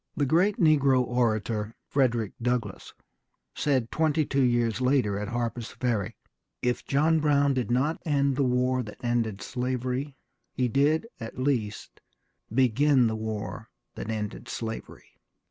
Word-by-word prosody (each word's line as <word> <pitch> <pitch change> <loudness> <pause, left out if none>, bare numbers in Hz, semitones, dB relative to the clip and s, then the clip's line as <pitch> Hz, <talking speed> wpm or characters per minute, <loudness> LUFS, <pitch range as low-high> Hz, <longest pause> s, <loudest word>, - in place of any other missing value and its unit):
The 145 - +2
great 180 +9 +3
negro 140 -6 +4
orator, 115 -3 -1
Frederick 120 -6 +1
Douglass, 120 -4 -2 0.6
said 130 -6 0
twenty 155 -1 +1
two 140 0 0
years 120 -1 +1
later 125 -6 +2
at 105 - -4
Harper's 120 0 -3
Ferry, 110 -7 -2 0.4
"If 125 0 -1
John 155 +3 +3
Brown 145 -2 +3
did 125 -3 -1
not 130 +7 +1
end 140 -3 +1
the 140 - +1
war 125 0 +1
that 105 -3 -9
ended 115 -4 -1
slavery, 130 +2 -3 0.4
he 125 - +1
did, 145 - +2
at 115 - -7
least, 130 -6 -2 0.5
begin 130 +2 +4
the 110 -1 0
war 110 -1 -5 0.2
that - - -6
ended 110 +2 -4
slavery. 115 -1 -6
125 Hz, 135 wpm, -27 LUFS, 115-140 Hz, 0.6 s, negro